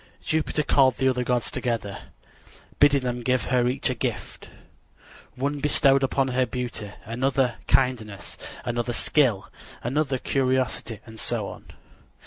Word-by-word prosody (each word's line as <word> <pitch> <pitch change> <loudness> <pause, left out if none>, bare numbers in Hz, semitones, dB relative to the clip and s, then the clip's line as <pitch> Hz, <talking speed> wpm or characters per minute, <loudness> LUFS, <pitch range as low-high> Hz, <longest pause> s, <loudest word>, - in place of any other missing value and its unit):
Jupiter 155 -1 0
called 135 -3 +4
the 130 - +1
other 125 -1 +1
gods 125 -1 0
together, 115 -5 -2 0.8
bidding 145 -1 +5
them 125 -1 -2
give 125 +1 +1
her 125 -1 +2
each 125 +2 -1
a - - 0
gift. 120 - -5 0.9
One 140 +3 -2
bestowed 140 -1 +4
upon 135 0 +1
her 130 0 +1
beauty, 120 -3 -4 0.2
another, 125 +1 0
kindness, 115 -6 0 0.3
another, 120 0 -1
skill, 120 -7 +1 0.3
another, 135 +2 0
curiosity, 130 -4 0
and 110 -1 -11
so 110 -4 -2
on. - - -11
125 Hz, 130 wpm, -25 LUFS, 120-135 Hz, 0.9 s, bidding